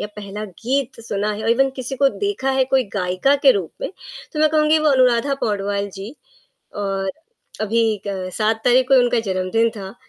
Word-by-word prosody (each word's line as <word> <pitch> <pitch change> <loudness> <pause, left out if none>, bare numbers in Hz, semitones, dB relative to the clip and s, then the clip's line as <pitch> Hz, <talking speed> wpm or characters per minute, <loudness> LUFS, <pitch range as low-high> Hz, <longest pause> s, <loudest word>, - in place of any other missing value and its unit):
या - - -2
पहला 210 +1 -6
गीत 240 +7 -3
सुना 205 +1 -1
है 210 - -6
और - - -2
इवन 270 +3 +3
किसी 260 +1 -5
को 275 0 +4
देखा 400 -7 -2
है, 265 -1 +2
कोई 265 -1 +2
गायिका 185 +9 +1
के - - +8
रूप 405 - -3
में, - - -3 0.4
तो 305 - -3
मैं 310 - +5
कहूँगी 310 0 +3
वो 305 -1 +2
अनुराधा 255 +1 +3
पौडवाल 200 -1 -1
जी। 200 +7 -8 0.6
और 195 -1 -2 0.5
अभी 220 -1 +1
क 190 -2 -3
7 220 +1 0
तारीख 250 +1 +4
को 270 - +5
ही 255 - +7
उनका 245 -1 +2
जन्मदिन 195 +3 0
था, 195 -1 -9
230 Hz, 195 wpm, -20 LUFS, 200-270 Hz, 0.6 s, के